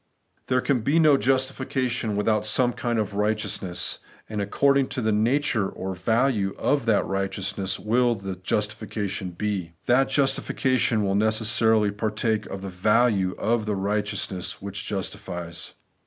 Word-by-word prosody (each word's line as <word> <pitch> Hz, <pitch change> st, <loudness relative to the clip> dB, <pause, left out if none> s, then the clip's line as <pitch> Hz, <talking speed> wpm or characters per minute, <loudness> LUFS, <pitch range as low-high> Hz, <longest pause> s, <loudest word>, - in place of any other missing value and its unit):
There 125 Hz, 0 st, +2 dB
can 130 Hz, -3 st, +1 dB
be 140 Hz, +8 st, +1 dB
no 155 Hz, -3 st, +6 dB
justification 130 Hz, -3 st, 0 dB
without 105 Hz, +1 st, +1 dB
some 120 Hz, +3 st, +2 dB
kind 120 Hz, -1 st, -2 dB
of 105 Hz, -3 st, -1 dB
righteousness; 105 Hz, -3 st, -2 dB, 0.3 s
and 105 Hz, -1 st, -3 dB
according 140 Hz, +6 st, +2 dB
to 130 Hz, -, -4 dB
the 110 Hz, -1 st, +1 dB
nature 110 Hz, -1 st, +1 dB
or 95 Hz, 0 st, -5 dB
value 105 Hz, +1 st, +1 dB
of 140 Hz, -4 st, 0 dB
that 110 Hz, -3 st, +3 dB
righteousness 95 Hz, 0 st, -2 dB
will 120 Hz, +2 st, +2 dB
the 95 Hz, -2 st, -5 dB
justification 100 Hz, 0 st, -3 dB
be. 90 Hz, -2 st, -3 dB
That 130 Hz, +2 st, +3 dB
justification 130 Hz, -4 st, +1 dB
will 95 Hz, -1 st, 0 dB
necessarily 110 Hz, 0 st, +3 dB
partake 110 Hz, +1 st, -1 dB
of 95 Hz, 0 st, -7 dB
the -, -, -4 dB
value 100 Hz, 0 st, +2 dB
of 110 Hz, -1 st, 0 dB
the 105 Hz, -, 0 dB
righteousness 100 Hz, -2 st, -2 dB
which 100 Hz, +1 st, -5 dB
justifies. 90 Hz, -4 st, -5 dB
105 Hz, 140 wpm, -25 LUFS, 100-120 Hz, 0.3 s, no